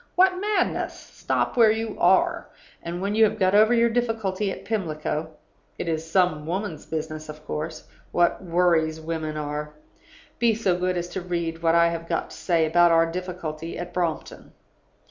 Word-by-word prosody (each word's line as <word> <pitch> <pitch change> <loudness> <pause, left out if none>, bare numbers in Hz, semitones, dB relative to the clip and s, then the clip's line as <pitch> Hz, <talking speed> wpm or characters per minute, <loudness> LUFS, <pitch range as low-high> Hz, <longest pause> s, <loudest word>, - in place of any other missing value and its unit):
What 370 0 +4
madness! 420 0 0
Stop - - -3
where 230 -3 +6
you 220 0 -1
are; 340 - +3 0.3
and 175 +2 -5
when 200 +1 -1
you 220 +1 +4
have 215 - -1
got 190 -2 +2
over 215 +2 +6
your 235 -1 +4
difficulty 225 -4 -1
at 195 - -8
Pimlico 160 -6 -2 0.5
(it - - -4
is 160 0 -2
some 165 -4 +1
woman's 180 -3 -4
business, 155 -1 -5
of 150 0 -10
course; 155 +1 -5 0.3
what 175 +2 +2
worries 165 -3 +2
women 160 -1 -4
are!), 150 0 -4 0.6
be 235 -2 +3
so 195 -5 +1
good 180 0 -1
as 175 0 -2
to 190 - -4
read 170 -2 -3
what 165 0 +3
I 170 0 +5
have 165 0 -5
got - - -2
to - - -9
say 170 -3 +1
about 175 +2 +4
our 165 0 +5
difficulty 170 -3 -5
at 175 +1 -6
Brompton. 170 -3 -3
175 Hz, 175 wpm, -25 LUFS, 160-205 Hz, 0.6 s, where